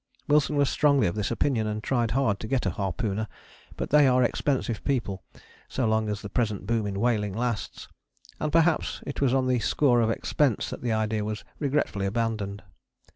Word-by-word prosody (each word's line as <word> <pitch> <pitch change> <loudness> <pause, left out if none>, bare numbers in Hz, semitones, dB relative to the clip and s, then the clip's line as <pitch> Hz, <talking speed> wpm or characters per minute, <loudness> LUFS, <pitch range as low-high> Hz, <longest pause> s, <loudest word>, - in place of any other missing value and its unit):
Wilson 150 0 +3
was 145 -1 +3
strongly 140 0 +3
of 85 - 0
this 105 -1 -2
opinion 115 -2 0
and 105 0 -3
tried 120 -2 +1
hard 110 -4 +1
to 110 - -6
get 130 +1 0
a - - +1
harpooner, 105 +1 -2 0.5
but - - -4
they 150 -1 +6
are 125 0 +4
expensive 120 -2 -1
people 110 -9 -1 0.5
so 130 - -1
long 110 -1 +1
as 105 0 -4
the - - -4
present 105 -4 -1
boom 110 0 0
in 100 -1 -3
whaling 105 -3 +1
lasts, 115 -2 -3 0.5
and 155 - -1
perhaps 165 0 +2
it 140 - -5
was 135 -3 +3
on 130 0 +2
the 125 -1 +2
score 120 +1 +3
of 115 - +2
expense 125 +1 0
that - - -6
the 120 - -1
idea 110 -1 0
was 105 -1 -4 0.2
regretfully 140 -9 0
abandoned. 105 -2 -2
115 Hz, 190 wpm, -26 LUFS, 105-135 Hz, 0.5 s, they